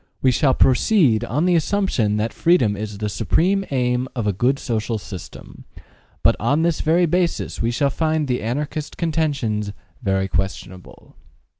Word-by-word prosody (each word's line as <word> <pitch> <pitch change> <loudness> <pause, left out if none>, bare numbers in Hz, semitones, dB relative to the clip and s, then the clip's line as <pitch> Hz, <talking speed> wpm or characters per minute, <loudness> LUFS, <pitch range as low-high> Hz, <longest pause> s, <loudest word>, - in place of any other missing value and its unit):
We 130 - +3
shall 130 +1 +2
proceed 135 - +3
on 140 +8 -1
the 180 - +3
assumption 160 - +1
that 110 +2 -2
freedom 130 - +2
is 105 0 -6
the 105 +1 -3
supreme 160 - +1
aim 125 -1 0
of 115 -4 -2
a 105 - +1
good 125 +8 +1
social 115 -2 -2
system; 90 - -10 0.6
but - - +4
on 145 +8 +1
this 170 -2 0
very 170 +3 +3
basis 175 +1 -1
we 115 - +1
shall 140 +4 +1
find 155 0 0
the 125 -1 -1
Anarchist 145 +6 -4
contentions 140 - -1 0.3
very 95 -3 0
questionable. 95 -1 -5
125 Hz, 155 wpm, -21 LUFS, 105-155 Hz, 0.6 s, but